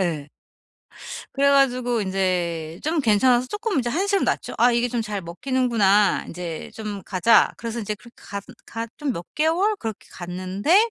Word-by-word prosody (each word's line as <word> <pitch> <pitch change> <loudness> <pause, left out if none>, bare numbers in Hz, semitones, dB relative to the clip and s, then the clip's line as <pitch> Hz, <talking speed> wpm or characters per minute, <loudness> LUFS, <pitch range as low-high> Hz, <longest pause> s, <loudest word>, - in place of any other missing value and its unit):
예. 155 -6 -1 1.1
그래 280 +1 +3
가지고 250 -4 +3
인제 180 -4 -1
좀 315 +2 0
괜찮아서 245 +1 +4
쪼끔 415 - -2
인제 245 -3 +1
한시름 390 +8 +1
놨죠. - - -1
'아 245 +1 +6
이게 235 +1 +2
좀 240 0 -1
잘 210 -3 -3
먹히는구나. 210 +1 +2
인제 170 -2 -6
좀 210 -3 -5
가자!' 190 +5 +4
그래서 230 0 -5
인제 210 -1 -2
그 225 +3 -16
가슨 200 -2 -8
가 230 0 -4
좀 285 -3 -2
몇 170 - -6
개월 350 +8 +2
그렇게 225 - -6
갔는데 190 - +1
230 Hz, 310 characters per minute, -23 LUFS, 190-270 Hz, 1.1 s, 아